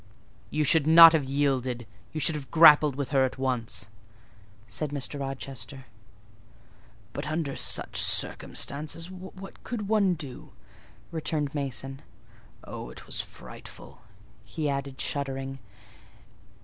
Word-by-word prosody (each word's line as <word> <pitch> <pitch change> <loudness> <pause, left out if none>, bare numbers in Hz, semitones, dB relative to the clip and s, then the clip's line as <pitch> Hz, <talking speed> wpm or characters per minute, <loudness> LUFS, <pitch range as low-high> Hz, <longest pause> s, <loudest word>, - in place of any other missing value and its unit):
"You 155 - 0
should 155 0 +3
not 165 0 +10
have 155 -4 +1
yielded: 130 -3 -1 0.3
you 155 - -4
should 160 - +4
have 145 -4 -6
grappled 150 -3 +7
with 140 -1 -3
her 135 -2 +3
at 130 - -2
once," 125 -7 -2 0.8
said 130 +7 -3
Mr. 145 0 -4
Rochester. 135 -1 -6 1.3
"But - - -5
under 155 -3 -2
such - - +1
circumstances, 155 +5 +1
what 190 +1 -11
could 215 -5 -4
one 200 -4 +3
do?" 145 -6 -9 0.6
returned 155 -3 -2
Mason. 135 -1 -4 0.6
"Oh, - - -8
it 60 - -11
was - - -3
frightful!" - - -12 0.4
he 150 +8 -4
added, 140 -1 -3
shuddering. 135 -1 -3
140 Hz, 120 wpm, -27 LUFS, 135-160 Hz, 1.3 s, not